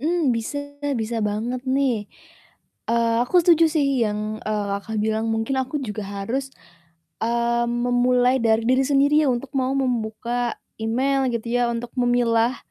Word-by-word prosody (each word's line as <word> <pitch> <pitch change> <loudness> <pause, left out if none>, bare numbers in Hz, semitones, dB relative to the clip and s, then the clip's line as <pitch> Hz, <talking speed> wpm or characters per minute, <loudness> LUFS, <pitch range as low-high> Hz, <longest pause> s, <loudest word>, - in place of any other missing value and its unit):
Mmm, 310 -4 +1
bisa 230 +6 -3 0.4
bisa 225 +1 -3
banget 225 +5 -2
nih. 270 -2 +2 0.9
Eee, 230 0 +2
aku 250 - -7
setuju 330 -1 +5
sih 290 -3 +2 0.2
yang, 210 +1 -3
eee, 210 -1 -1
Kakak, 220 +2 -6
bilang, 220 +1 0
mungkin 225 +5 -1
aku 265 +2 -2
juga 215 -3 -4
harus, 230 +8 -4 0.7
mmm, 235 +1 +1 0.2
memulai 245 +1 +3
dari 225 0 +2
diri 255 +2 +3
sendiri 280 +1 +3
ya - - +1
untuk 255 +3 -3
mau 260 0 +1
membuka 240 -1 -2 0.2
email 260 +4 +1
gitu 235 0 -3
ya 245 -1 +2
untuk 235 0 -4
memilah, 240 0 +2
240 Hz, 145 wpm, -23 LUFS, 225-265 Hz, 0.9 s, setuju